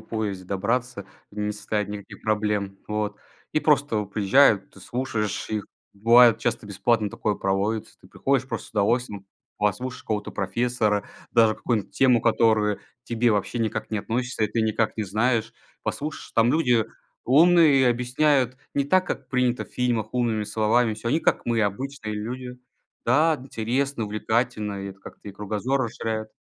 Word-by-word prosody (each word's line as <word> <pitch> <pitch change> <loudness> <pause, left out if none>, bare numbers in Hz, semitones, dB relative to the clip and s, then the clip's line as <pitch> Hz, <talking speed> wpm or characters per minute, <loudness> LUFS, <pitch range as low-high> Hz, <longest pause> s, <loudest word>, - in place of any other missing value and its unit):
поезде 105 -4 -4
добраться, 100 +3 -2 0.2
не 105 0 -3
составит 105 0 -3
никаких 105 -1 -9
проблем. 105 -2 -1
Вот. 105 -1 -2 0.4
И 155 - +2
просто 145 -9 +2
приезжают, 100 +1 +3
ты 100 - -16
слушаешь 110 0 -3
их. 105 -1 -2 0.3
Бывает 115 +2 +6
часто 120 -2 -2
бесплатно 105 +2 +1
такое 105 +1 -2
проводится. 100 +3 -1
Ты - - -18
приходишь 135 -1 0
просто 115 -3 -5
с - - -18
удовольствием, 105 -1 0 0.3
послушаешь 115 +5 -2
какого-то 105 -1 -3
профессора, 105 +1 0 0.3
даже 115 -2 +4
какую-нибудь 110 -3 -2
тему, 125 -3 +4
которую 110 -3 +2
к - - -24 0.2
тебе 120 0 +1
вообще 105 +3 -1
никак 110 -1 -2
не 110 - +1
относишься 120 +3 -2
и - - -1
ты 115 - 0
никак 110 0 0
не 110 - -1
знаешь. 110 +4 0 0.3
Послушаешь, 150 +1 -5
там 115 +1 +4
люди 125 -7 +3 0.4
умные 155 +1 +6
и 130 - +4
объясняют 125 +2 +2 0.2
не 140 - +2
так, 185 +6 +2
как - - -4
принято 125 -2 0
в - - -21
фильмах 120 -4 -1
умными 120 -4 0
словами 110 +2 +1
всё. 110 +2 -5
Они 155 +7 +2
как - - +1
мы- 115 -1 +1
обычные 110 +2 -3
люди. 125 +4 -6 0.5
Да! 155 +6 +4
Интересно, 130 +1 -2
увлекательно, 105 -1 -1
и 100 - -5
это 95 - -14
как-то 95 - -12
и - - -8
кругозор 105 +7 -1
расширяет. 110 -2 -3
115 Hz, 160 wpm, -25 LUFS, 105-125 Hz, 0.5 s, Бывает